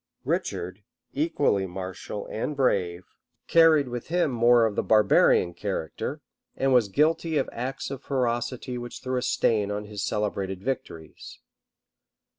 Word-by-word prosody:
Richard, 95 +4 -2 0.3
equally 145 - +1
martial 95 +2 -6
and 145 +7 -3
brave, 90 -9 +1 0.4
carried 160 -4 +5
with 120 -1 -6
him 170 -3 +1
more 120 -1 +5
of 110 -2 -1
the - - +1
barbarian 105 -4 +4
character, 95 -5 -4 0.3
and 135 0 +1
was 120 -4 +4
guilty 155 - +1
of 135 - +1
acts 130 +3 -4
of 135 -1 -6
ferocity 125 -1 -2
which 120 0 -8
threw 130 0 -2
a - - 0
stain 110 -4 +1
on 105 0 -3
his 105 -1 -5
celebrated 100 -2 -2
victories. 100 -11 -6
120 Hz, 135 wpm, -26 LUFS, 100-135 Hz, 0.4 s, carried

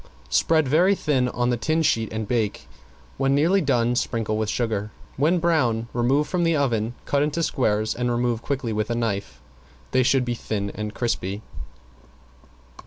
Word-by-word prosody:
Spread 160 -3 +3
very 175 +8 +4
thin 135 -8 +1
on 120 0 0
the 120 - 0
tin 155 +7 0
sheet 115 -7 +1
and 110 -1 -3
bake. 115 -3 -1 0.5
When 135 0 +2
nearly 170 +7 +3
done 120 -5 +1
sprinkle 115 -3 -1
with 110 -1 -1
sugar; 105 -3 -1 0.3
when 155 +7 +2
brown 130 -10 +1
remove 130 +5 +2
from 180 -2 0
the 165 -1 +2
oven, 120 -5 0
cut 140 - +1
into 150 +3 0
squares 110 -6 0
and 125 0 -1
remove 120 -1 0
quickly 130 -5 -2
with 110 +1 -1
a 120 - 0
knife. 100 - -3 0.5
They 130 - +3
should 130 0 +2
be 120 - -1
thin 100 -3 -3
and 105 0 -6
crispy. 105 -4 -2
120 Hz, 170 wpm, -24 LUFS, 110-145 Hz, 0.5 s, very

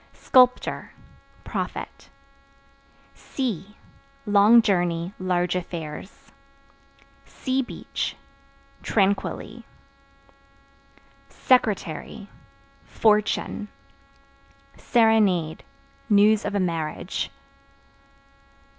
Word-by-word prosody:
Sculptor 250 -1 +2 0.5
Profit. - - -6 1.0
Sea 210 - -5 0.5
Long 210 +3 +6
journey, 175 -3 0
large 180 -1 0
affairs. 170 0 -7 1.0
Seabeach 260 -1 -3 0.7
Tranquilly. 200 -1 -1 1.7
Secretary 210 -4 0 0.6
Fortune. 210 -1 0 1.1
Serenade 210 -9 +2 0.5
News 210 +1 +4
of - - -3
a - - +1
marriage. 165 -4 -3
200 Hz, 50 wpm, -24 LUFS, 175-220 Hz, 1.7 s, Long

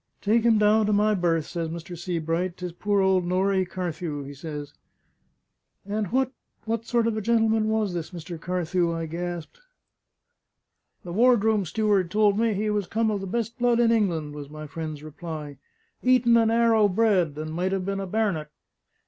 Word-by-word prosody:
'Take 220 +3 +3
him 230 -1 +4
down 210 0 +4
to - - +2
my 210 +1 +3
berth,' 170 -5 +1
says 170 -2 -4
Mr. 170 +2 -7
Sebright. 170 0 -2
''Tis 180 -1 -5
poor 205 +2 +1
old 190 -1 +3
Norrie 185 +1 +1
Carthew,' 170 -5 -4
he 140 +1 -8
says." 145 0 -7 1.1
"And 205 +1 -2
what 260 +5 +1 0.3
what 230 0 -2
sort 235 -2 +2
of 230 -1 0
a - - -1
gentleman 225 0 +2
was 215 -4 0
this 170 -2 -4
Mr. 170 -2 -8
Carthew?" 175 -1 0
I 165 0 -3
gasped. 175 - -6 1.4
"The 175 - -7
ward 240 +1 +4
room 220 -3 +2
steward 205 -1 +1
told 210 +1 +3
me 225 -2 +2
he 210 +2 0
was 205 -3 -1
come 220 0 0
of 205 -2 -2
the 195 - -5
best 230 +4 -3
blood 240 -1 +3
in 235 -1 +4
England," 170 -10 0
was 145 -1 -8
my 155 0 -8
friend's 155 -1 -6
reply: 155 -3 -7 0.4
"Eton 250 -2 +4
and 225 -1 +4
'Arrow 230 -2 +4
bred; 185 -7 +2
and 155 +1 -5
might 180 +3 -1
have 190 -1 -1
been 195 0 -2
a 195 - -4
bar'net!" 185 -7 -1
190 Hz, 180 wpm, -25 LUFS, 165-220 Hz, 1.4 s, him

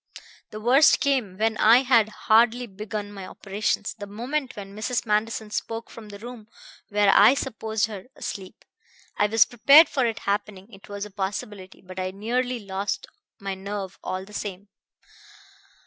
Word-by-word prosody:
"The 215 - -8
worst 260 +8 +5
came 250 -10 0
when 220 +1 0
I 235 +4 +6
had 230 -5 +4
hardly 230 +3 +3
begun 205 0 -6
my 195 -2 -8
operations; 205 +1 -2
the 205 - -6
moment 250 +7 -3
when 200 -1 -9
Mrs. 235 +4 -2
Manderson 215 0 -1
spoke 225 +2 -4
from 220 -2 -11
the 205 - -9
room 230 0 -10 0.4
where 205 -1 +3
I 215 +6 +7
supposed 220 -5 -2
her 205 -4 -8
asleep. 190 -2 -8 0.5
I 210 - +3
was 225 +1 +5
prepared 280 +7 +7
for 260 -4 +1
it 225 -1 -3
happening; 205 +1 -3
it 195 +2 -15
was 205 0 -5
a 210 - -11
possibility; 195 -1 -5
but 185 0 -8
I 185 0 -2
nearly 245 +6 -2
lost 200 - -4 0.3
my 195 -1 -4
nerve 195 0 -6
all 185 +1 -4
the 210 - -15
same. 200 -1 -6
210 Hz, 165 wpm, -25 LUFS, 200-230 Hz, 0.5 s, I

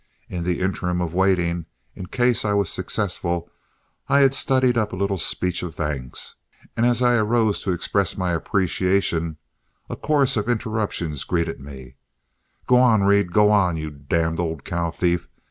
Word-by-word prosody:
In 90 -2 -4
the 90 0 -1
interim 90 -1 -1
of 85 -2 -2
waiting, 90 -3 +1 0.3
in 90 - -8
case 120 +3 +1
I 105 -1 0
was 100 -4 +1
successful, 85 -4 -2 0.6
I 140 - +5
had 135 -1 +5
studied 130 -2 +2
up 110 -3 0
a - - -4
little 100 0 -1
speech 90 +2 -1
of 85 -3 -6
thanks, 70 -5 -5 0.4
and 115 - +2
as 120 0 +2
I 120 -1 +4
arose 110 -1 +2
to 95 - -1
express 90 +1 -1
my 90 -2 0
appreciation, 85 -2 0 0.5
a - - -3
chorus 140 -5 +1
of 105 +2 -1
interruptions 110 - -2
greeted 85 -2 -1
me: 65 -2 -11 0.7
"G' - - +3
on, 120 -5 +5
Reed! 100 -2 +3
G' 105 - +4
on, 100 -5 +3
you 80 -1 -5
d 70 -1 -16
d - - +2 0.2
old 80 -4 -3
cow 85 -1 -1
thief! 85 0 -1
95 Hz, 170 wpm, -23 LUFS, 85-110 Hz, 0.7 s, I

